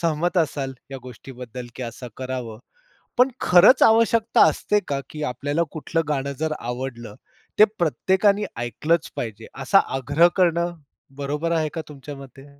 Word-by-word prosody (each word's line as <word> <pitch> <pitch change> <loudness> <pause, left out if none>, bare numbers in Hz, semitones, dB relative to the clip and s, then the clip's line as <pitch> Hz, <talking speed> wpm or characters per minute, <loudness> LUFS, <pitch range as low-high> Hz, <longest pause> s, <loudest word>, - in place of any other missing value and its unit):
सहमत 170 +2 0
असाल, 140 -4 -1 0.2
या 135 - -6
गोष्टीबद्दल 125 -1 -9
की 130 - -6
असं 120 +1 -7
करावं? 125 -4 -5 0.6
पण 250 +1 +6
खरंच 180 +9 +6
आवश्यकता 230 0 +4
असते 210 0 0
का? 140 -1 -1
की 155 -1 -7
आपल्याला 145 +5 -1
कुठलं 165 +1 -2
गाणं 140 -1 -1
जर 160 0 -1
आवडलं, 120 -2 -6 0.4
ते 215 - +10
प्रत्येकाने 190 +5 +2 0.2
ऐकलंच 155 +8 -1
पाहिजे, 110 -1 -5 0.2
असा 135 +9 +5 0.2
आग्रह 165 +7 +4
करणं 175 -1 +2 0.4
बरोबर 150 +4 -2
आहे 160 -2 +1
का 165 - -3
तुमच्या 145 0 -9
मते? 135 0 -13
150 Hz, 145 wpm, -23 LUFS, 130-170 Hz, 0.6 s, ते